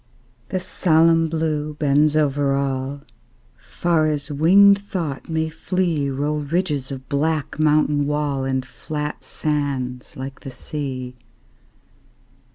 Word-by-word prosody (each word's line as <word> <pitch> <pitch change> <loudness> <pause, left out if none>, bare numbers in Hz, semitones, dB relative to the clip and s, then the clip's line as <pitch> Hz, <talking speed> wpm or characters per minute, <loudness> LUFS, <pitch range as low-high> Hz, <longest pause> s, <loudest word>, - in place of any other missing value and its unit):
The 185 - -1
solemn 165 -2 +3
Blue 155 -2 -1
bends 150 +1 +3
over 145 -2 +2
all; 135 0 -2 0.5
Far 165 -3 0
as 150 -1 -2
winged 200 +7 +6
thought 170 -9 -4
may 160 0 0
flee 160 -2 -1
Roll 145 +3 -1
ridges 150 -2 -1
of 130 -1 -7
black 155 +1 -1
mountain 150 -1 +3
wall, 145 -2 -1
And 130 -1 -1
flat 150 +3 -5
sands 135 -4 -3
like 135 0 -6
the - - -8
sea. 130 -2 -5
150 Hz, 115 wpm, -22 LUFS, 140-160 Hz, 0.5 s, winged